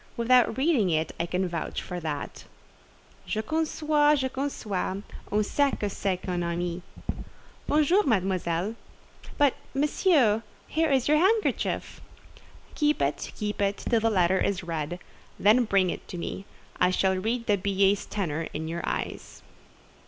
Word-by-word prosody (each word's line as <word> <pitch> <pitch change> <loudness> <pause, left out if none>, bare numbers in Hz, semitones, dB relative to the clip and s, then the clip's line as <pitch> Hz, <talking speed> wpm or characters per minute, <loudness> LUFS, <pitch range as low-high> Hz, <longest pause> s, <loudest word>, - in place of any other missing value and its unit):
Without 240 0 +4
reading 265 - +3
it, 160 -1 0
I 170 - 0
can 180 +2 0
vouch 170 -2 -3
for 180 - -5
that." 150 -4 -5 0.8
"Je 215 0 -1
conçois, 305 -1 +2
je 265 -1 -1
conçois: 210 -8 -3 0.3
on 210 +1 +2
sait 285 +6 +2
ce - - -2
que 205 - -2
c'est 190 -1 -1
qu'un 180 -1 -3
ami. 170 +1 -2 0.9
Bonjour, 310 +7 +4
Mademoiselle!" 190 - 0 0.6
"But, 285 -3 +4 0.2
Monsieur, 275 - +3 0.3
here 320 0 +1
is 265 -3 +2
your 300 +1 +5
handkerchief." 415 +6 +1 0.7
"Keep 300 0 +1
it, 140 +1 -1
keep 210 -1 -3
it, 200 0 +1
till 230 - +1
the 225 +1 +2
letter 185 -2 +3
is 195 -1 0
read, 165 0 -3 0.4
then 225 +5 +5
bring 195 -4 +2
it - - -8
me; 185 +3 -5 0.3
I 180 - +4
shall 190 +1 +2
read 230 +5 -1
the 210 - +3
billet's 195 +1 +1
tenor 165 -6 -2
in 160 +1 -3
your 170 +1 -3
eyes." - - -4
205 Hz, 145 wpm, -27 LUFS, 180-265 Hz, 0.9 s, your